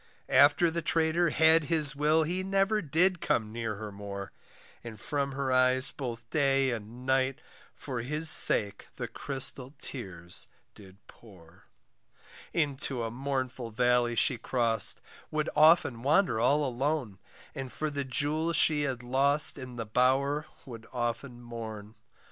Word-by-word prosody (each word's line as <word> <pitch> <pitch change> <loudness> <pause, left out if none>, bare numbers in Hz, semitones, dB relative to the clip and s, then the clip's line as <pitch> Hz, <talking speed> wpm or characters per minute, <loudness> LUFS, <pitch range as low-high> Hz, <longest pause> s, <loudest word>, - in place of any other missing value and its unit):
After 150 +4 +4
the 170 +1 -3
traitor 165 +1 +1
had 160 0 +3
his 150 -3 +1
will 155 +2 +1
He 180 +4 -3
never 195 +3 0
did 180 +3 0
come 110 -2 -1
near 115 -1 -5
her 105 0 -8
more, 100 -1 -8 0.5
And 115 -3 -10
from 140 +2 -3
her 135 -1 -3
eyes 130 0 +1
both 115 -4 -7
day 135 -3 +1
and 115 +2 -8
night, 130 0 0 0.4
For 125 -4 -6
his 150 +6 0
sake 100 -9 +7
the - - -6
crystal 135 0 -2
tears 95 - -6 0.3
did 95 -2 -16
pour, 90 -7 -19 0.9
Into 140 -5 -2
a 115 - -4
mournful 130 -1 -4
valley 120 +1 0
she 125 +1 +2
crossed, 115 -4 +1 0.3
Would 155 0 -2
often 155 -6 +4
wander 140 - +1
all 145 +5 +1
alone, 130 -5 -3 0.3
And 135 -1 -7
for 155 -1 -4
the 140 -1 -4
jewel 150 +5 -1
she 150 -1 +4
had 130 -4 -4
lost 140 +4 +4
In 125 -2 -9
the 115 -1 -5
bower 135 +6 0 0.2
would 115 -4 -11
often 120 0 -5
mourn. 110 -3 -9
130 Hz, 140 wpm, -28 LUFS, 115-150 Hz, 0.9 s, sake